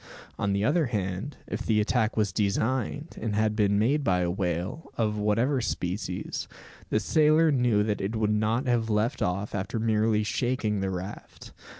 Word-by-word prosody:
On 100 - 0
the 100 +1 +1
other 155 +1 +2
hand, 100 +3 -3
if 110 - -4
the 110 -2 +2
attack 110 +1 +1
was 105 -4 +1
designed, 120 - -1
and 110 -2 -1
had 110 0 +1
been 100 -2 +2
made 135 +8 +2
by 90 -7 +2
a 85 -1 0
whale, 90 - -3
of 105 -2 0
whatever 115 +6 +1
species, 90 -3 -3 0.4
the 105 - +2
sailor 155 +7 +4
knew 120 -6 +3
that 105 -1 -1
it 100 +4 -2
would 105 -1 +1
not 110 +4 +1
have 120 -3 +1
left 105 +2 0
off 95 +4 -1
after 100 +3 -3
merely 110 -1 +2
shaking 110 -2 -1
the 95 0 -1
raft. 95 +2 -7
105 Hz, 175 wpm, -27 LUFS, 100-120 Hz, 0.4 s, sailor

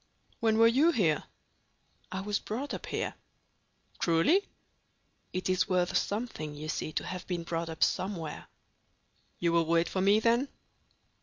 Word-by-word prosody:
When 220 -1 +2
were 225 - +7
you 270 +8 +4
here?" 170 - +1 0.9
"I 190 +1 -3
was 205 +1 -1
brought 255 +7 -4
up - - -6
here." - - -2 0.9
"Truly?" 175 - +3 0.8
"It 185 - -2
is 185 +2 +1
worth 180 -1 +1
something, 200 -9 -2
you 155 +1 -6
see, 155 - -2
to - - -2
have 185 -1 -6
been 175 -2 -2
brought 165 0 -3
up 160 -1 0
somewhere." 185 -5 -2 0.9
"You 170 -1 +1
will 170 -1 +3
wait 170 +1 +3
for 185 - -1
me, 200 +3 +5
then?" 235 +4 +2
185 Hz, 150 wpm, -30 LUFS, 165-220 Hz, 0.9 s, were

